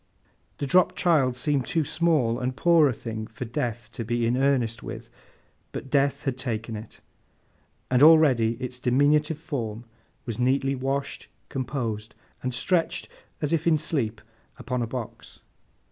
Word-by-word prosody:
The - - -2
dropped 180 +6 +4
child 145 -8 +3
seemed 135 0 0
too 160 -2 +1
small 140 -9 +1
and 130 0 -2
poor 170 -2 +5
a - - +1
thing 110 -2 -6
for 130 -2 -7
Death 120 0 -3
to 115 - -5
be 120 +1 0
in 120 +2 +2
earnest 125 -4 +1
with, - - -8 0.6
but 135 - -7
Death 140 0 +2
had 130 -2 -2
taken 115 -3 -3
it; 110 +2 -10 0.9
and 125 0 +3
already 145 -8 +6
its 125 +1 -6
diminutive 145 +5 +2
form 120 -8 -5 0.4
was 115 -3 -5
neatly 135 +2 +2
washed, 135 +1 -3 0.2
composed, 115 -5 -4 0.3
and 130 - -2
stretched 165 +7 0 0.3
as 150 - 0
if 165 0 0
in 160 -2 +5
sleep 130 -9 -2 0.4
upon 125 -2 -3
a 115 - -1
box. 120 -1 -7
130 Hz, 150 wpm, -26 LUFS, 120-145 Hz, 0.9 s, already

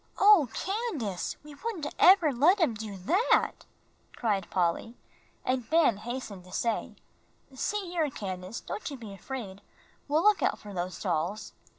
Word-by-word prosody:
"Oh, 390 - +6
Candace, 370 - -2
we 300 0 -11
wouldn't 370 -1 -4
ever 355 -6 +7
let 325 +11 +4
him 320 -9 +3
do 215 -2 -6
that!" 355 - +1 0.5
cried 205 -6 -1
Polly. 185 +6 0 0.5
And 255 -2 -1
Ben 315 -9 +4
hastened 215 -4 -6
to 180 - -14
say, 230 +4 -1 0.6
"See 415 +10 -1
here, 325 -4 +1
Candace, 190 -3 -6
don't 335 - -5
you 280 - -7
be 220 -5 -9
afraid; 200 -2 -7 0.5
we'll 305 +3 +2
look 420 -1 +5
out - - +1
for 205 -1 -10
those 180 0 -4
dolls." 180 +3 -2
240 Hz, 150 wpm, -29 LUFS, 195-330 Hz, 0.6 s, ever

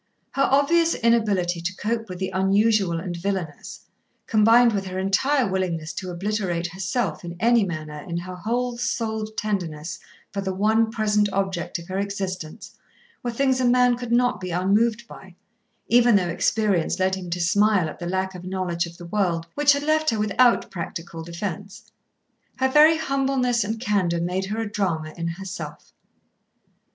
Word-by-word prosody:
Her 275 - +2
obvious 325 +5 +3
inability 205 -7 +1
to 185 +2 -3
cope 225 +1 -2
with 180 - -6
the 190 +1 -3
unusual 195 -1 +2
and 175 0 -5
villainous, 175 -4 -4 0.4
combined 230 +2 +5
with 195 -2 -2
her 185 0 -5
entire 240 +8 +2
willingness 175 -4 -2
to 185 - -5
obliterate 180 -1 -2
herself 175 - -2
in 170 0 -6
any 235 +1 +4
manner 155 -5 -5
in 170 - -2
her 185 +2 -6
whole 240 +5 -2
souled 220 -3 -2
tenderness 170 -7 -3 0.3
for 200 - -3
the 190 -1 -3
one 220 +3 +2
present 210 -2 +1
object 190 -3 -2
of 170 0 -11
her 190 +1 -3
existence, 190 -5 -5 0.5
were 245 - -3
things 260 +2 +1
a - - +1
man 245 0 +4
could 245 -1 -6
not 245 -2 +2
be 185 - -4
unmoved 210 +6 +1
by, 190 -5 -13 0.5
even 240 -1 +5
though 180 -3 +2
experience 195 -1 +1
led 190 0 +1
him 185 -2 -4
to 175 +1 -2
smile 200 +1 +3
at 155 - -8
the 175 -1 -4
lack 190 +1 -1
of 180 -1 -9
knowledge 180 -2 -2
of 170 0 -13
the 175 - -10
world 170 -3 0
which 290 0 +4
had 285 0 -2
left 310 +1 +2
her 225 - 0
without 215 +4 +3
practical 170 -2 -6
defence. 195 +3 -6 0.6
Her 265 0 +1
very 305 +4 +6
humbleness 270 -5 +1
and 220 +2 -3
candour 195 -7 0
made 180 +3 -1
her 210 +3 -4
a 225 - -2
drama 170 -7 -2
in 170 -1 -3
herself. 185 +2 -7
195 Hz, 170 wpm, -24 LUFS, 175-230 Hz, 0.6 s, very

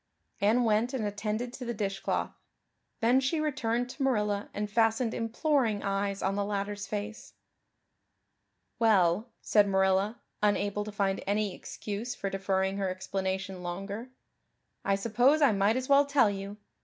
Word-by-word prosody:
Anne 220 +4 +3
went 230 +3 +2
and 225 -5 -1
attended 215 +4 -3
to 260 - -7
the 235 -1 -3
dishcloth. 195 -2 -2 0.7
Then 240 +3 +4
she 270 +5 0
returned 245 -5 0
to 285 - -10
Marilla 210 -6 0
and 210 +1 -3
fastened 225 +2 +2
imploring 230 -2 0
eyes 200 0 -1
of 195 +1 0
the 205 - 0
latter's 205 0 -3
face. 210 +1 -5 1.5
"Well," 210 -1 +3
said 210 -1 +4
Marilla, 190 +3 +2 0.2
unable 205 0 +1
to 215 - -6
find 200 -2 -1
any 205 -1 0
excuse 215 +6 -5
for 195 - -4
deferring 190 0 0
her 195 -1 0
explanation 190 0 -3
longer, 195 +7 -5 0.7
"I 195 - +2
suppose 240 +8 +3
I 285 -5 +5
might 205 +3 +2
as 255 0 -3
well 280 0 +5
tell 280 -7 +4
you. 200 +1 -6
210 Hz, 145 wpm, -29 LUFS, 195-235 Hz, 1.5 s, I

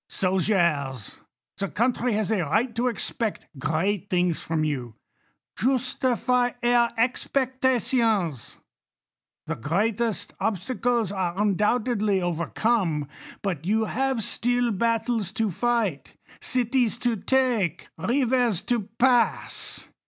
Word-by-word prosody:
Soldiers, 170 - 0 0.4
the 195 - 0
country 240 +1 0
has 215 0 0
a 210 -4 +2
right 220 - 0
to 240 +3 0
expect 230 -1 -2
great 185 +7 -1
things 180 -3 +1
from 160 -1 -1
you; 125 -7 -3 0.6
justify 250 -1 +1
her 240 -1 +4
expectations. 245 - 0 0.9
The - - -3
great 200 - 0
est 230 -3 -2
obstacles 230 +1 0
are 185 -2 -2
undoubtedly 210 0 +1
overcome; 175 -1 0 0.4
but 180 -7 -2
you 220 +5 +1
have 260 0 -1
still 245 +1 0
battles 225 -1 0
to 220 -3 0
fight, 225 - -1 0.2
cities 245 -2 +1
to 240 -1 0
take, 230 - 0
rivers 245 -5 +1
to 235 -5 -2
pass. 245 -1 +1
220 Hz, 105 wpm, -25 LUFS, 185-245 Hz, 0.9 s, her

